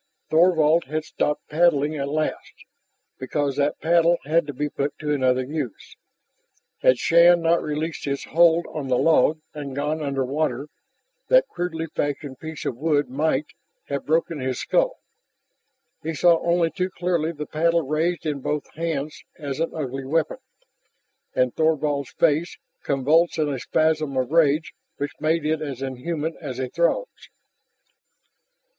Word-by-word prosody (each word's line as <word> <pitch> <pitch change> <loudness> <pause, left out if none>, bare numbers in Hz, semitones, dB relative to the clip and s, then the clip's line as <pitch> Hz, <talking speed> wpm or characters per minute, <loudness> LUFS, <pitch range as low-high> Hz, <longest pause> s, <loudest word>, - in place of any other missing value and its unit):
Thorvald 165 -1 +4
had 155 +3 -3
stopped 150 - -2
paddling 155 -2 +2
at 140 -1 -3
last, 155 +1 -3 0.5
because 140 +1 -1
that 145 0 0
paddle 170 +1 +4
had 160 +1 +2
to - - -3
be 145 +3 -2
put 140 0 -3
to 150 -1 -2
another 130 -2 +2
use. 140 -4 -6 0.9
Had 130 - +5
Shann 170 +5 +5
not 165 +1 +3
released 155 +2 -3
his 140 -1 -2
hold 170 +1 +4
on 145 -3 -4
the 125 -1 +2
log 155 0 +3
and 145 -3 -6
gone 150 +2 -1
under 140 -2 -1
water, 140 0 -2 0.6
that - - +5
crudely 175 -2 -3
fashioned 145 -3 -4
piece 160 -1 -7
of 120 - -2
wood 145 0 +1
might, 150 +1 0 0.4
have 140 -1 -3
broken 160 0 +1
his 130 -1 -2
skull. - - +1 1.1
He 160 +1 -4
saw 170 +2 +4
only 170 -1 +2
too 185 0 -2
clearly 175 -3 -1
the 150 -2 -6
paddle 165 +2 +1
raised 160 +5 -1
in 150 -2 -1
both 150 +2 -3
hands 155 -2 -3
as 145 -2 -5
an 165 - 0
ugly 135 -3 -4
weapon, 155 - 0 1.0
and 125 -1 +2
Thorvald's 150 -3 0
face, 165 +2 +1 0.2
convulsed 150 +6 +2
in 155 -2 +1
a 135 -3 -3
spasm 155 +2 0
of 130 +1 -1
rage 155 -1 +3 0.2
which 145 0 -3
made 155 0 +1
it 155 0 0
as 135 -4 -5
inhuman 150 +5 -3
as 135 -6 -5
a 130 -1 -3
Throg's. 170 - -1
155 Hz, 150 wpm, -23 LUFS, 140-165 Hz, 1.1 s, Had